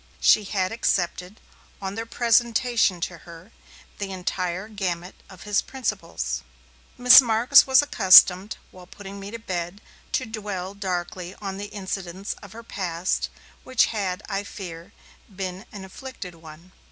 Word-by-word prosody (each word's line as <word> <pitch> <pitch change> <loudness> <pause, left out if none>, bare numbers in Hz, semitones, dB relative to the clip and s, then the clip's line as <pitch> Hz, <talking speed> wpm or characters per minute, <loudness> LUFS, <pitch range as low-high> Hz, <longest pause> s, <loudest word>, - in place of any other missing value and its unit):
She 210 - +4
had 190 -2 -1
accepted, 180 -3 -1 0.4
on 195 -1 -5
their 225 +2 -5
presentation 235 -4 +2
to 170 -1 -4
her, 170 +5 -14 0.5
the 200 -1 -4
entire 185 +1 -3
gamut 185 -4 -4 0.2
of 185 -3 -13
his 205 -1 +1
principles. 170 - -4 0.6
Miss 250 +1 +10
Marks 240 +4 +5
was 265 +2 +6
accustomed, 190 -5 +6
while 180 -1 -14
putting 200 +1 -10
me 195 0 -8
to 230 - -6
bed, 180 -3 -5 0.3
to 255 - 0
dwell 205 -4 -5
darkly 180 -2 -4
on 195 -2 -6
the 200 - -5
incidents 195 -1 -5
of 200 -1 -12
her 230 +1 -10
past, 180 -4 -2 0.3
which 260 -2 +3
had, 195 -2 -3
I 200 -1 -2
fear, 170 -5 -9 0.4
been 190 +1 -6
an 195 -2 -9
afflicted 205 -2 -9
one. 165 +2 -14
195 Hz, 140 wpm, -24 LUFS, 180-220 Hz, 0.6 s, Miss